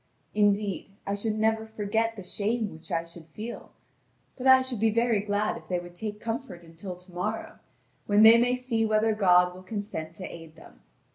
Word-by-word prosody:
Indeed, 205 -2 +1 0.2
I 200 - -1
should 215 +1 -2
never 220 0 +1
forget 220 +1 -1
the 200 - -8
shame 210 +3 -1
which 160 +1 -12
I 165 - 0
should 170 -1 -14
feel; 215 +9 -8 0.7
but 260 0 -2
I 260 0 +8
should 255 -4 -3
be 225 +1 +3
very 230 0 +2
glad 205 +1 -1
if - - -14
they 180 - 0
would 175 0 -8
take 210 +3 -5
comfort 225 -6 -5
until 170 +3 -8
to 180 +1 -16
morrow, 210 +5 -4 0.5
when 205 +1 +5
they 225 +1 +9
may 245 +1 +3
see 250 -3 -1
whether 220 0 +2
God 180 -3 +4
will 185 - -11
consent 185 -5 -5
to 185 - -7
aid 165 -1 -10
them. 110 - -16
210 Hz, 195 wpm, -27 LUFS, 180-225 Hz, 0.7 s, they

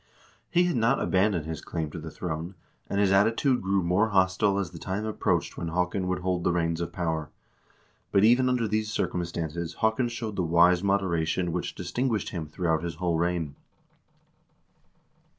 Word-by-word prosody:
He 175 0 +3
had 175 -6 0
not 115 +4 +3
abandoned 95 -4 +1
his 80 -1 -5
claim 80 -3 -4
to 85 - -6
the 80 0 -7
throne, 85 +2 -5 0.3
and 100 - 0
his 100 -2 +3
attitude 115 +6 +3
grew 95 0 +1
more 90 +6 +2
hostile 95 +1 +2
as 95 -4 -2
the 85 - -9
time 95 +5 -3
approached 110 - -1
when 85 - -3
Haakon 90 +2 -1
would 90 0 -1
hold 90 -1 -1
the - - +2
reins 85 -1 0
of 85 0 -3
power, 80 -3 -2 0.8
but 100 - +4
even 125 +3 +5
under 125 -3 +1
these 110 0 -1
cir - - 0
cumstances 85 -1 -4
Haakon 110 +3 +1
showed 115 -3 -5
the - - +1
wise 85 +1 +4
moderation 90 -3 0
which 90 +1 -3
distinguished 110 +4 -1
him 80 -4 -4
throughout 80 0 0
his 85 -1 -4
whole 85 -1 0
reign. 85 -4 -1
90 Hz, 175 wpm, -27 LUFS, 85-105 Hz, 0.8 s, even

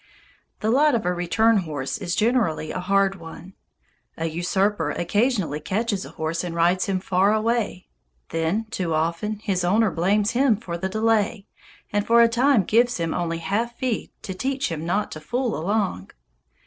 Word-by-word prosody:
The 220 - +1
lot 290 +3 +4
of 225 - -1
a 180 - +1
return 215 +6 +2
horse 155 -1 -3
is 180 -3 -2
generally 215 -10 +1
a - - -3
hard 195 +1 +1
one. 170 +2 -11 0.6
A 165 - -2
usurper 175 +1 0
occasionally 195 - 0
catches 200 +4 -2
a - - -9
horse 160 +1 -3
and 175 -2 -4
rides 175 +2 +2
him 190 -1 -1
far 190 +2 +2
away. 220 -4 -1 0.4
Then, 165 +7 -1
too 170 -4 -1
often, 170 +7 -1
his 190 -4 0
owner 210 +3 +3
blames 200 +6 +1
him 245 -3 +3
for 185 -6 -6
the 190 +2 -3
delay, 215 -1 +1 0.5
and 205 0 +2
for 235 +2 +5
a - - +6
time 240 -1 +3
gives 240 +5 +2
him 165 -2 -2
only 165 -1 -2
half 225 +8 -2
feed 250 -4 -2
to 190 - -5
"teach 265 +3 -2
him 160 0 -4
not 205 +4 0
to 155 - -6
fool 240 +9 -2
along." 185 - -1
195 Hz, 175 wpm, -23 LUFS, 170-225 Hz, 0.6 s, a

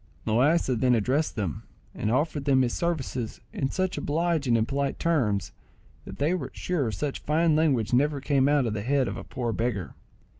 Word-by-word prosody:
Loaysa 130 +4 +2
then 125 0 +4
addressed 130 +8 0
them, 95 -9 -3 0.3
and 105 - -2
offered 145 +2 0
them 135 -2 +4
his 120 - -1
services 135 -9 -2
in 135 - -1
such 185 +4 -1
obliging 155 -5 +1
and 110 0 +1
polite 140 0 -1
terms, 115 - 0 0.5
that - - -9
they 150 +5 +1
were 185 - -3
sure 155 -10 -1
such 140 +5 -3
fine 160 +1 +2
language 135 -8 +2
never 145 +3 +2
came 135 0 +2
out 145 -3 +3
of 110 - -1
the 105 - -3
head 135 +3 +1
of - - -3
a - - -7
poor 120 -3 -3
beggar. 115 -6 -2
135 Hz, 185 wpm, -27 LUFS, 120-155 Hz, 0.5 s, then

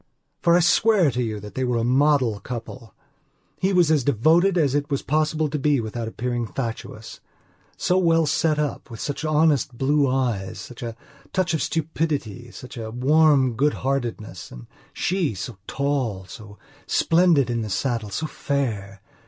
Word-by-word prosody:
For 170 0 +5
I - - +3
swear 180 -1 +4
to 125 +1 -2
you 110 -3 -3
that 105 0 -10
they 130 - -2
were 125 -1 0
the 115 - 0
model 130 -3 +2
couple. 115 -2 -8 0.6
He 190 +1 +1
was 175 -4 +4
as 150 -4 +3
devoted 160 - +3
as 145 -5 +2
it 145 0 -1
was 140 -2 -1
possible 155 +1 +1
to 150 +1 -3
be 145 0 +2
without 115 0 -4
appearing 120 +1 -3
fatuous. 115 -2 -6 0.6
So 180 +1 +2
well 165 -2 +3
set 155 +1 +1
up, 150 -2 -3
with 115 -3 -9
such 145 +2 -4
honest 150 -5 +2
blue 140 +1 +2
eyes, 120 -7 -1
such 125 - -10
a 115 -2 -5 0.4
touch 185 -3 +1
of 160 - 0
stupidity, 150 -8 -2
such 125 +2 -11
a 110 -1 -5
warm 135 +1 +3
goodheartedness! 120 - -2
And - - -11 0.3
sheso 130 - -2
tall, 130 -9 -1
so 105 +1 -12 0.3
splendid 165 -7 +3
in 115 -1 -1
the 110 - -4
saddle, 110 +3 -2
so 130 +11 -3
fair! 110 -11 -3
135 Hz, 160 wpm, -23 LUFS, 115-155 Hz, 0.6 s, For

